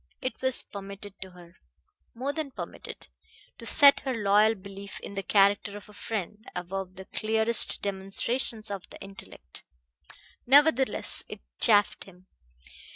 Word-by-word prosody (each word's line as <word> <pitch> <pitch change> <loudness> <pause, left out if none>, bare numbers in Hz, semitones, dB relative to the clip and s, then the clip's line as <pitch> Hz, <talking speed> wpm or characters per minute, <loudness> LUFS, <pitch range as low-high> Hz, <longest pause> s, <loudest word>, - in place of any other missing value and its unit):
It 255 - -5
was 260 -1 +3
permitted 200 0 -9
to 190 - -8
her 175 -1 -17 0.6
more 265 +4 -3
than 310 -1 -4
permitted 260 - -9 0.5
to - - -8
set 280 -2 +7
her 265 -2 -3
loyal 210 +1 +3
belief 200 0 -10
in - - -8
the 195 - -3
character 200 +2 +2
of 205 - -13
a 210 - -16
friend 210 0 -5
above 185 +1 -5
the 190 - -10
clearest 220 +2 +2
demonstrations 205 +3 0
of 195 -2 -7
the - - -13
intellect. 95 - -10 0.8
Nevertheless, 270 -3 +3
it - - -9 0.2
chafed 205 -1 +3
him. 185 -1 -18
205 Hz, 140 wpm, -27 LUFS, 195-230 Hz, 0.8 s, set